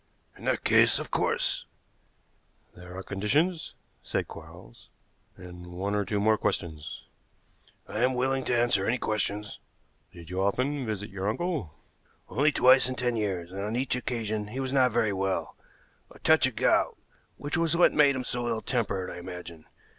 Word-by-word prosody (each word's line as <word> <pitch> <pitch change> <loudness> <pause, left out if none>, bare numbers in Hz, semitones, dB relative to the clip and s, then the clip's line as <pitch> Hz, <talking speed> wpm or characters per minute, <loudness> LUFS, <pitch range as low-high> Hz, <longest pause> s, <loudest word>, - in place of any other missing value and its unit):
"In - - -12
that - - 0
case, - - +5
of - - -5
course - - 0 0.5
" - - -39
"There 90 +1 -10
are 95 - -5
conditions," 150 - 0 0.3
said - - -2
Quarles, - - -13 0.5
"and 90 -1 -10
one 95 +3 -3
or 105 -1 0
two 105 +2 -1
more 110 +1 +3
questions." 80 -6 -3 0.8
"I 105 - -4
am 125 +2 +2
willing 130 +1 0
to 120 - +1
answer 110 -5 +2
any 120 - +2
questions." 105 -2 -2 0.5
"Did 85 0 -12
you 95 +1 -1
often 130 +7 0
visit 105 -1 -4
your 95 +1 -2
uncle?" 145 - -2 0.5
"Only 150 +3 +3
twice 130 -1 +6
in 130 - -3
ten 125 -1 0
years, 95 -6 -2
and 95 +1 -5
on 105 +3 -2
each 125 0 0
occasion 110 -4 -2
he 120 +5 -6
was 135 0 -2
not 130 -2 +4
very 110 -2 +1
well 95 0 -2 0.5
a - - -15
touch - - +4
of - - -6
gout, - - +2 0.4
which 145 - -3
was 165 0 +2
what 175 - +5
made 145 -2 +5
him 130 - -2
so 120 -1 -2
ill 115 -1 -1
tempered, 105 -7 -1
I - - -7
imagine. 85 -2 -9
110 Hz, 175 wpm, -28 LUFS, 95-130 Hz, 0.8 s, twice